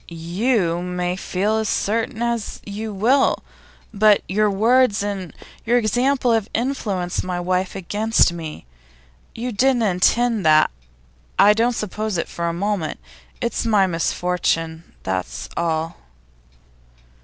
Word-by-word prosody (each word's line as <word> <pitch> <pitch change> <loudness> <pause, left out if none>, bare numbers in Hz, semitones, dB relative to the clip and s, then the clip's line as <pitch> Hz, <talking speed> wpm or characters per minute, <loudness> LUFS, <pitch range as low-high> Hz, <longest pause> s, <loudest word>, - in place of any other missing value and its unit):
'You 175 +2 0
may 180 0 -2
feel 195 +3 -1
as 220 -1 -1
certain 225 +2 -1
as 235 -2 -2
you 215 +2 -5
will, 235 +8 +2 0.5
but 210 0 +4
your 210 +2 +2
words 220 +1 +3
and 195 -4 -4 0.3
your 240 +2 +2
example 245 +3 +1
have 225 -2 0
influenced 210 -8 -1
my 180 -1 -3
wife 185 +1 -1
against 205 +1 +1
me. 160 - -7 0.7
You 245 +2 -3
didn't 245 +2 +2
intend 215 +3 +2
that; 155 - +5 0.7
I 210 - +7
don't 230 +3 +1
suppose 215 -1 -3
it 165 - -2
for 170 0 -3
a - - 0
moment. 185 -2 -2 0.4
It's 235 - -1
my 210 -4 +3
misfortune, 165 -1 -1
that's 95 -1 -3
all. 165 -1 -1
200 Hz, 125 wpm, -21 LUFS, 175-225 Hz, 0.7 s, I